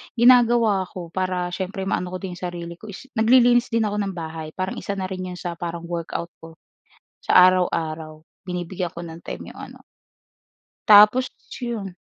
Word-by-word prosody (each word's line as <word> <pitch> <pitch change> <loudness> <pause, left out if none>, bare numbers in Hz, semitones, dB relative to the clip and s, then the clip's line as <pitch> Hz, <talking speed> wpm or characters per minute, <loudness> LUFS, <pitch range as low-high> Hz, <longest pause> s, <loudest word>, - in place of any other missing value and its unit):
Ginagawa 235 -5 +5
ko 180 -2 -9
para 185 0 -2
siyempre 190 +2 -4
maano 180 -1 -2
ko 185 - -5
din 185 -3 -6
yung 180 - -6
sarili 170 -1 -6
ko 215 - -13
is 210 +6 -10
naglilinis 240 +1 +5
din 230 -1 +2
ako 210 -1 -1
ng 195 - -4
bahay. 160 -2 -6
Parang 185 0 -4
isa 200 - -4
na 190 -1 -4
rin 185 -1 -5
yung 180 - -9
sa 175 -2 -5
parang 170 -1 -5
workout 170 0 -4
ko 165 0 -13 0.7
sa - - +3
araw-araw. 160 -4 -1 0.3
Binibigyan 180 0 -4
ko 170 +1 -8
ng 165 0 -10
time - - -8
yung - - -13
ano - - -15 1.1
tapos 210 +4 +7 0.3
yun. 225 -7 -4
185 Hz, 175 wpm, -23 LUFS, 170-210 Hz, 1.1 s, tapos